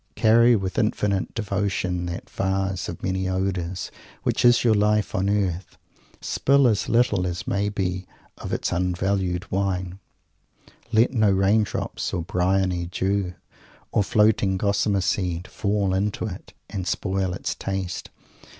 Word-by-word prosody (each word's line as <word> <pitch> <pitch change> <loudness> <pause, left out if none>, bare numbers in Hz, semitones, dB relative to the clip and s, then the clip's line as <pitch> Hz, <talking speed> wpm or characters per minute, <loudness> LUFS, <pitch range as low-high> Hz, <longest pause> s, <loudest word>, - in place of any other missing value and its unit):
"Carry 115 +2 +5
with 95 -3 -2
infinite 105 -3 0
devotion 100 -4 -1
that 85 +1 -6
vase 95 -2 -1
of - - -8
many 95 0 -1
odours 95 -1 -2 0.3
which - - 0
is 120 -1 +5
your 115 -2 +4
Life 105 0 +2
on 95 +2 0
Earth. 95 -3 -1 0.4
Spill 140 -1 +3
as 105 -4 +1
little 105 -6 +2
as 85 -1 -4
may 100 +1 0
be 95 -2 -3 0.3
of - - -6
its - - -1
unvalued 90 +1 -1
wine; 95 -1 -1 0.9
let 115 +3 +3
no 110 -4 +3
rain 100 +3 +3
drops 105 - -3
or 85 - -2
bryony 90 -1 0
dew, 95 0 -1 0.6
or 105 - +2
floating 105 -2 +3
gossamer 100 0 +1
seed, 90 -2 -1
fall 100 -2 0
into 100 +3 -1
it 95 -4 -8
and 95 -3 -5
spoil 95 -2 -1
its - - -3
taste. 95 -2 -4
95 Hz, 140 wpm, -24 LUFS, 90-105 Hz, 0.9 s, Carry